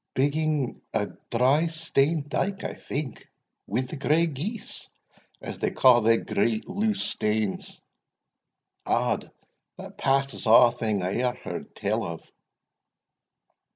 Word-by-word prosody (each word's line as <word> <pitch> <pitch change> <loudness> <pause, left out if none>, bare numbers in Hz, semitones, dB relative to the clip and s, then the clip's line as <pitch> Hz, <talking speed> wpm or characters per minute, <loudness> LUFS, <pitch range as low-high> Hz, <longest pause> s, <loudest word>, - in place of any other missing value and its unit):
"Biggin 145 -1 0
a 105 -2 +2 0.2
dry 135 +7 +3
stane 160 -2 0
dyke, 195 +6 -2
I - - -3
think, 140 -3 -6 0.4
wi' 110 +6 0
the 130 +4 -6
grey 155 +4 +3
geese, 170 - -6 0.5
as - - -7
they - - +1
ca' 125 -2 +5
thae 115 +1 +4
great 110 +1 -1
loose 205 +1 0
stanes 105 -2 -2 1.0
Odd, - - 0 0.5
that - - -10
passes 135 -2 +1
a' 120 +2 +8
thing 110 -5 -1
I 95 +2 -1
e'er 125 0 +1
heard - - -7
tell - - -1
of!" 85 -1 -7
135 Hz, 120 wpm, -26 LUFS, 115-155 Hz, 1.0 s, a